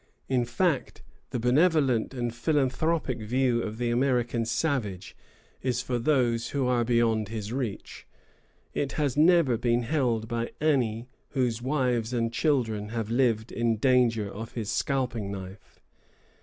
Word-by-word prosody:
In 125 Hz, -2 st, +1 dB
fact, 140 Hz, +4 st, -1 dB, 0.3 s
the -, -, -3 dB
benevolent 135 Hz, -1 st, +3 dB
and 120 Hz, -3 st, -3 dB
philanthropic 140 Hz, +1 st, 0 dB
view 120 Hz, +2 st, +1 dB
of 110 Hz, -1 st, -5 dB
the 120 Hz, 0 st, -1 dB
American 120 Hz, -2 st, +1 dB
savage 110 Hz, -, -2 dB, 0.5 s
is 125 Hz, -1 st, -1 dB
for 125 Hz, -1 st, -2 dB
those 120 Hz, -3 st, +1 dB
who 140 Hz, -2 st, -1 dB
are 125 Hz, -1 st, +2 dB
beyond 115 Hz, -2 st, +2 dB
his 110 Hz, 0 st, -5 dB
reach: 125 Hz, -6 st, -5 dB, 0.7 s
it 140 Hz, -, -2 dB
has 145 Hz, -4 st, 0 dB
never 165 Hz, -2 st, +5 dB
yet 115 Hz, -1 st, -1 dB
been 120 Hz, 0 st, +2 dB
held 120 Hz, -5 st, 0 dB
by 115 Hz, 0 st, -3 dB
any 125 Hz, -7 st, +1 dB, 0.3 s
whose 120 Hz, -3 st, +1 dB
wives 125 Hz, -3 st, 0 dB
and 115 Hz, -1 st, 0 dB
children 115 Hz, -9 st, 0 dB
have 115 Hz, -1 st, -3 dB
lived 115 Hz, -3 st, +1 dB
in 115 Hz, -1 st, 0 dB
danger 120 Hz, -3 st, +3 dB
of 110 Hz, +3 st, -8 dB
his 110 Hz, -3 st, -3 dB
scalping 125 Hz, -8 st, -1 dB
knife. 95 Hz, 0 st, -9 dB
120 Hz, 140 wpm, -27 LUFS, 115-130 Hz, 0.7 s, never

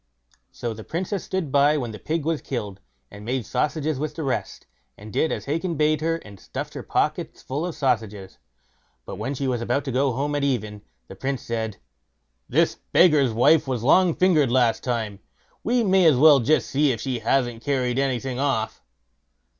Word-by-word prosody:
So 120 Hz, -1 st, -4 dB
the 110 Hz, 0 st, -9 dB
Princess 185 Hz, -, -3 dB
stood 185 Hz, -7 st, -3 dB
by 145 Hz, +2 st, +4 dB
when 120 Hz, -5 st, -3 dB
the 105 Hz, -, -9 dB
pig 160 Hz, -1 st, -2 dB
was 160 Hz, -2 st, -1 dB
killed, 105 Hz, -7 st, -5 dB, 0.3 s
and 105 Hz, -, -11 dB
made 125 Hz, +1 st, -2 dB
sausages 150 Hz, +2 st, -1 dB
with 150 Hz, 0 st, -3 dB
the 160 Hz, -, -4 dB
rest, 135 Hz, -2 st, -3 dB, 0.3 s
and 105 Hz, 0 st, -11 dB
did 160 Hz, -, +1 dB
as -, -, -4 dB
Hacon 165 Hz, +4 st, -2 dB
bade 155 Hz, +1 st, +2 dB
her, 165 Hz, +1 st, +1 dB
and 100 Hz, -2 st, -12 dB
stuffed -, -, -6 dB
her -, -, -6 dB
pockets -, -, -2 dB
full 145 Hz, +6 st, -3 dB
of 175 Hz, -, -6 dB
sausages. 110 Hz, -7 st, -2 dB, 0.7 s
But -, -, -7 dB
when 125 Hz, +7 st, -3 dB
she 135 Hz, +1 st, -2 dB
was 125 Hz, -2 st, -1 dB
about 125 Hz, +4 st, -1 dB
to 135 Hz, -, -3 dB
go 135 Hz, +2 st, +1 dB
home 145 Hz, +4 st, -2 dB
at 145 Hz, -1 st, -1 dB
even, 110 Hz, -7 st, -2 dB, 0.3 s
the 95 Hz, -, -10 dB
Prince 135 Hz, +4 st, -3 dB
said: 110 Hz, -3 st, -3 dB, 0.7 s
"This -, -, +2 dB
beggar's 150 Hz, -8 st, +5 dB
wife 140 Hz, +7 st, +4 dB
was 125 Hz, -4 st, -2 dB
long 175 Hz, +5 st, +4 dB
fingered 160 Hz, -9 st, +3 dB
last 120 Hz, -3 st, +2 dB
time; 110 Hz, -5 st, -2 dB, 0.4 s
we 240 Hz, +1 st, +2 dB
may 190 Hz, -3 st, +4 dB
as 155 Hz, -4 st, +6 dB
well 145 Hz, 0 st, +7 dB
just 150 Hz, +6 st, +1 dB
see 145 Hz, +1 st, +3 dB
if 115 Hz, -, -3 dB
she 130 Hz, -1 st, -3 dB
hasn't 120 Hz, 0 st, 0 dB
carried 130 Hz, -3 st, 0 dB
anything 130 Hz, -1 st, -1 dB
off." 135 Hz, -6 st, -1 dB
135 Hz, 190 wpm, -24 LUFS, 115-155 Hz, 0.7 s, well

